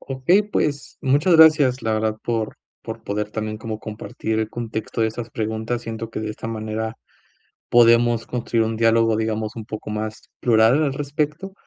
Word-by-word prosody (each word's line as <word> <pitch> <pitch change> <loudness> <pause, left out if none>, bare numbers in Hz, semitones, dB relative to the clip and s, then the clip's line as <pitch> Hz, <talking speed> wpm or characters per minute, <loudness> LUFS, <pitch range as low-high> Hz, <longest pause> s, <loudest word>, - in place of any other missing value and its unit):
Okey, 135 +10 +2
pues, 150 -8 -2
muchas 145 +6 +3
gracias, 150 -5 +6
la 110 - 0
verdad 110 0 0
por 115 -2 -2 0.3
por - - -7
poder 105 +1 -2
también 110 0 -4
como 110 -1 -5
compartir 110 +1 -4
el 110 - -2
contexto 115 -1 -3
de - - +3
estas 115 +1 -5
preguntas. 110 +2 -3
Siento 115 0 -6
que - - -5
de 110 0 -3
esta 115 +1 -6
manera 110 0 -4 0.7
podemos 115 -1 +4
construir 115 -2 0
un 110 0 -2
diálogo, 115 -1 +3
digamos, 110 -1 -2
un 110 -2 -7
poco 110 0 -7
más 110 +1 -4 0.2
plural 120 +5 +4
al 140 -3 +1
respecto. 150 +6 -3
115 Hz, 170 wpm, -22 LUFS, 110-125 Hz, 0.7 s, gracias